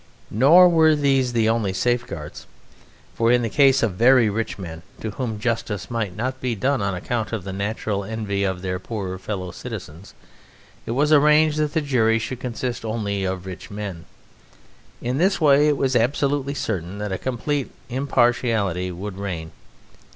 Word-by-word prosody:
Nor 155 - +7
were 160 -2 +5
these 135 -3 +2
the 115 -2 +2
only 110 -4 +1
safeguards. 105 -9 -3 0.7
For 115 0 +2
in 120 0 +3
the 115 - -2
case 135 -2 +4
of 115 - +2
very 120 +2 +5
rich 115 +1 -3
men, 85 -4 -7 0.2
to 110 - -4
whom 110 -2 -4
justice 105 -5 -2
might 110 -6 -2
not 130 +4 -3
be 125 -2 -1
done 130 +4 0
on 100 -1 -1
account 110 +3 -3
of 110 -5 -3
the 95 0 -6
natural 100 0 -2
envy 100 -2 -3
of 95 -2 -2
their 90 -1 -2
poorer 95 -3 -5
fellow 95 -3 -5
citizens, 85 +2 -9 0.7
it - - -2
was 150 +2 +3
arranged 150 +1 +5
that 150 -1 0
the 160 - +2
jury 115 -6 +2
should 120 +2 -4
consist 125 -1 -4
only 105 -3 -2
of 95 -1 -3
rich 95 +3 -8
men. 100 -5 -6 1.0
In 125 +3 -1
this 190 +3 +2
way 145 -1 +5
it 150 -2 +2
was 130 -2 0
absolutely 140 +3 +1
certain 95 - -3
that 105 -1 -4
a 95 - -2
complete 130 +2 -2 0.2
impartiality 120 -8 +1
would 95 +2 -7
reign. 85 -5 -5
115 Hz, 170 wpm, -22 LUFS, 100-130 Hz, 1.0 s, Nor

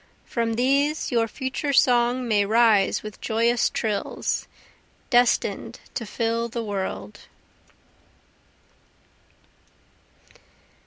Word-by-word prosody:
From 230 -1 -1
these 280 +5 +1
your 230 -2 +2
future 265 +4 -3
song 245 -1 +3
may 210 -3 +3
rise 220 -2 +3
with 215 -1 -9
joyous 230 +2 +1
trills, 215 -3 -2 0.6
Destin'd 245 -1 +1
to 230 -4 -4
fill 230 +2 -1
the 235 0 -4
world. 190 - -5
230 Hz, 85 wpm, -24 LUFS, 215-245 Hz, 0.6 s, song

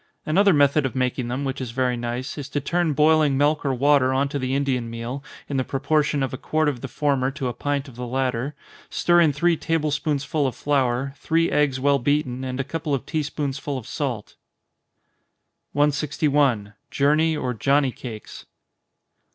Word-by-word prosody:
Another 195 +6 +4
method 145 -1 +4
of 135 - -3
making 125 -1 -1
them, 125 +3 -3
which 135 0 -3
is 130 - -4
very 125 +1 0
nice, 120 +2 -4
is 145 -2 -6
to 145 - -1
turn 170 +2 0
boiling 150 -1 +4
milk 150 +2 +2
or 140 - +1
water 135 0 +3
on 135 +2 +1
to 140 - -3
the 130 0 -1
Indian 130 -4 0
meal, 115 +4 -5 0.2
in 140 - -2
the 130 - +1
proportion 145 +1 0
of 130 - -3
a 130 - -5
quart 155 0 0
of 135 -5 -1
the 135 - -4
former 135 0 0
to 135 -1 -4
a 120 - -2
pint 145 +1 -2
of 125 -3 -13
the 125 0 -5
latter 130 +2 -1 0.3
stir 175 0 +3
in 160 -3 +4
three 170 +4 +2
table 160 -1 -1
spoonsful 145 0 0
of 125 - -4
flour, 135 -2 0
three 165 +3 +1
eggs 145 -3 +2
well 140 +1 +3
beaten, 130 -1 0
and 130 0 -4
a - - +1
couple 150 +1 -2
of 130 - -5
tea 155 -1 -1
spoonsful 145 -1 -3
of 125 - -7
salt. 130 -5 -4 1.4
161. 145 -6 +1 0.2
_Journey 155 +2 +2
or 125 -3 -2
Johnny 135 +3 +2
Cakes. 115 -4 -9
140 Hz, 185 wpm, -23 LUFS, 130-150 Hz, 1.4 s, Another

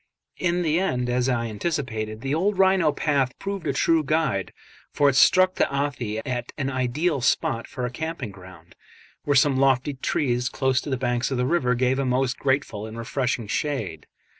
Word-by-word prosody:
In 175 0 +1
the 160 +1 +2
end, 125 -9 -1
as 125 +1 +1
I 120 -2 0
anticipated, 110 -3 -3
the 135 +2 -2
old 190 +5 +1
rhino 190 -4 +4
path 140 -4 0
proved 195 -4 -4
a - - +2
true 160 +3 +2
guide, 150 - 0 0.4
for 145 -1 +3
it 135 - 0
struck 185 +6 +5
the - - 0
Athi 125 -6 -2
at 125 -2 -3
an 135 -1 -2
ideal 135 +4 0
spot 115 -1 0
for 125 - -4
a 125 - -3
camping 160 -5 -5
ground, 90 -3 -14 0.5
where 145 - +2
some 135 0 +4
lofty 135 +1 +2
trees 125 -2 -1
close 130 -2 +1
to - - -7
the 130 - 0
bank 120 -1 -1
of 135 - -2
the 125 - +1
river 130 -5 +1
gave 130 +2 +1
a 135 - 0
most 125 0 0
grateful 130 -6 -1
and 110 +1 -9
refreshing 120 0 -2
shade. 105 - -3
130 Hz, 190 wpm, -24 LUFS, 120-150 Hz, 0.5 s, struck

